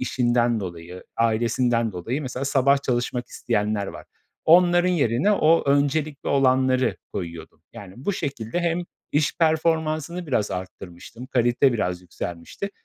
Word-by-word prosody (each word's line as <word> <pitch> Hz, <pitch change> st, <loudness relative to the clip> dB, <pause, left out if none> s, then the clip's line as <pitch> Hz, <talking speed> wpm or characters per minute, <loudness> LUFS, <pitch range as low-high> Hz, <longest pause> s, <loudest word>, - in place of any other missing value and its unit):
işinden 120 Hz, -2 st, +1 dB
dolayı, 90 Hz, 0 st, -8 dB
ailesinden 115 Hz, 0 st, +1 dB
dolayı 115 Hz, -, -3 dB
mesela 130 Hz, 0 st, -4 dB
sabah 140 Hz, 0 st, +3 dB
çalışmak 125 Hz, -1 st, -1 dB
isteyenler 105 Hz, -3 st, -1 dB
var. -, -, -9 dB, 0.4 s
Onların 175 Hz, +1 st, +5 dB
yerine 145 Hz, -, +2 dB
o 165 Hz, -4 st, +4 dB
öncelikli 145 Hz, +1 st, 0 dB
olanları 130 Hz, -2 st, +2 dB, 0.2 s
koyuyordum. 85 Hz, -4 st, -7 dB
Yani, 95 Hz, -2 st, -11 dB
bu 140 Hz, +11 st, -2 dB
şekilde 140 Hz, -, -3 dB
hem 170 Hz, 0 st, 0 dB, 0.3 s
iş 150 Hz, 0 st, +1 dB
performansını 160 Hz, +1 st, 0 dB
biraz 110 Hz, -7 st, 0 dB
arttırmıştım, 95 Hz, +5 st, -8 dB
kalite 120 Hz, +1 st, +2 dB
biraz 90 Hz, -5 st, -2 dB
yükselmişti 90 Hz, -, -6 dB
125 Hz, 120 wpm, -24 LUFS, 110-155 Hz, 0.4 s, Onların